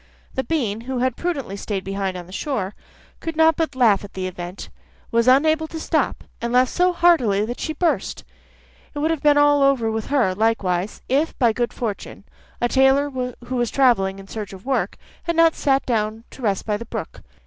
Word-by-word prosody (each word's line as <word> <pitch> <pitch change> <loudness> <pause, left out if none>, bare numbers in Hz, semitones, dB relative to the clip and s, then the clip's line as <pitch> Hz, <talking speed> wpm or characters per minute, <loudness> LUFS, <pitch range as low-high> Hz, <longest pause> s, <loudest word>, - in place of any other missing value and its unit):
The 265 - -1
bean, 230 -10 -1
who 260 - -1
had 255 0 0
prudently 285 - -3
stayed 200 -1 -4
behind 195 -1 -3
on 175 - -8
the 180 - -15
shore, 210 -4 -3 0.5
could 325 -1 -5
not 320 0 +5
but 315 -4 -2
laugh 225 -6 +4
at 205 - -11
the 185 -1 -3
event, 180 0 -7 0.4
was 235 +1 +2
unable 315 +4 +4
to 320 - -7
stop, 315 -3 -1 0.2
and 235 0 -2
laughed 250 +1 +3
so 360 +1 +3
heartily 310 - +3
that 240 +2 -5
she 315 - -3
burst. 335 +2 -1 0.7
It - - -5
would 310 +3 +1
have 320 -3 -2
been 295 -1 +4
all 290 0 +5
over 265 -5 +3
with 220 -1 -3
her, 255 -10 +2
likewise, 200 -3 0
if, 290 +5 0
by 235 -4 +3
good 240 +1 -1
fortune, 220 -5 -5 0.4
a 240 - +2
tailor 270 +3 +3
who 250 -1 -5
was 240 -2 0
travelling 215 -8 +2
in 195 0 -11
search 210 -1 -6
of 190 +2 -12
work, 270 0 -1 0.3
had 340 - -1
not 330 0 +5
sat 275 -1 +1
down 220 -2 -1
to - - -12
rest 200 -5 0
by 210 -1 0
the 235 - -8
brook. - - -6
245 Hz, 205 wpm, -22 LUFS, 205-290 Hz, 0.7 s, not